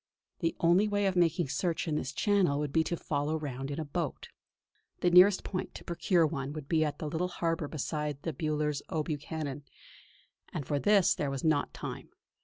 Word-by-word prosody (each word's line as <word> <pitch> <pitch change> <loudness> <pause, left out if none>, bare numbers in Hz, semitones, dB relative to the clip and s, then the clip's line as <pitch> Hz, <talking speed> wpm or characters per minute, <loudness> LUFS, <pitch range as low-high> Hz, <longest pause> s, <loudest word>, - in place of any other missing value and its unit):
The 165 -1 0
only 175 +5 +4
way 205 -1 +1
of 190 -1 +1
making 170 -3 +2
search 170 +4 -1
of 160 - 0
this 140 -3 -2
channel 190 -3 +2
would 145 -1 -2
be 160 - +4
to 170 - -2
follow 150 +1 -1
round 135 -3 -5
in 145 +2 -4
a 160 - -3
boat. 145 - -4 0.7
The 175 - +3
nearest 185 +2 +7
point 185 - -4
to - - -8
procure 170 0 +2
one 140 -2 -3
would 150 -3 -7
be 160 0 +2
at 150 -1 -2
the 155 - -4
little 160 +4 -1
harbour 165 -3 -1
beside 150 -1 -3
the 165 - -2
Bullers 150 -2 -1
O'Buchan, 150 -2 -3 0.9
and 140 - -4
for 145 +1 0
this 205 +2 +4
there 145 - -2
was 135 -1 -4
not 155 -3 +2
time. - - -7
155 Hz, 195 wpm, -30 LUFS, 145-175 Hz, 0.9 s, nearest